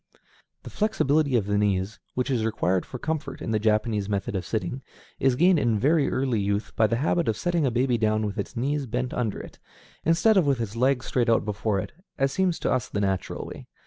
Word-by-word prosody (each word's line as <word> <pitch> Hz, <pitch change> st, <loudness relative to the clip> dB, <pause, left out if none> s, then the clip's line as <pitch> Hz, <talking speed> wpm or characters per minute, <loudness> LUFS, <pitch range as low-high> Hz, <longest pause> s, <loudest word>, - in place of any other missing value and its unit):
The -, -, -9 dB
flexibility 155 Hz, -, +1 dB
of 110 Hz, -5 st, +2 dB
the 100 Hz, 0 st, +1 dB
knees, 100 Hz, 0 st, 0 dB, 0.2 s
which 125 Hz, +2 st, -1 dB
is 120 Hz, -4 st, +1 dB
required 95 Hz, -4 st, 0 dB
for 125 Hz, -, -6 dB
comfort 150 Hz, -1 st, -4 dB
in -, -, -4 dB
the 110 Hz, -, +2 dB
Japanese 105 Hz, -1 st, +1 dB
method 100 Hz, 0 st, -2 dB
of 90 Hz, -3 st, -3 dB
sitting, 115 Hz, +5 st, -3 dB, 0.4 s
is 135 Hz, -2 st, +3 dB
gained 175 Hz, +4 st, +4 dB
in 115 Hz, -5 st, +2 dB
very 145 Hz, +6 st, +3 dB
early 130 Hz, -4 st, 0 dB
youth 100 Hz, +1 st, -2 dB
by 110 Hz, -, +4 dB
the 115 Hz, -, 0 dB
habit 160 Hz, +6 st, +1 dB
of 110 Hz, -, 0 dB
setting 170 Hz, -5 st, +1 dB
a -, -, +2 dB
baby 120 Hz, 0 st, +1 dB
down 110 Hz, 0 st, +1 dB
with 105 Hz, +1 st, -4 dB
its 100 Hz, -, -5 dB
knees 140 Hz, +3 st, -1 dB
bent 125 Hz, +2 st, -2 dB
under 115 Hz, -5 st, -2 dB
it, -, -, -11 dB, 0.4 s
instead 170 Hz, +7 st, +4 dB
of 175 Hz, -6 st, +3 dB
with 135 Hz, -3 st, +2 dB
its 110 Hz, -2 st, -4 dB
legs 125 Hz, +1 st, +1 dB
out -, -, -8 dB
straight 115 Hz, -3 st, +2 dB
before 105 Hz, 0 st, -1 dB
it, -, -, -5 dB, 0.3 s
as 135 Hz, -1 st, +1 dB
seems 185 Hz, +1 st, +1 dB
to -, -, 0 dB
us 130 Hz, -2 st, 0 dB
the 100 Hz, -, -2 dB
natural 95 Hz, -3 st, -2 dB
way. -, -, -9 dB
120 Hz, 225 wpm, -26 LUFS, 105-140 Hz, 0.4 s, gained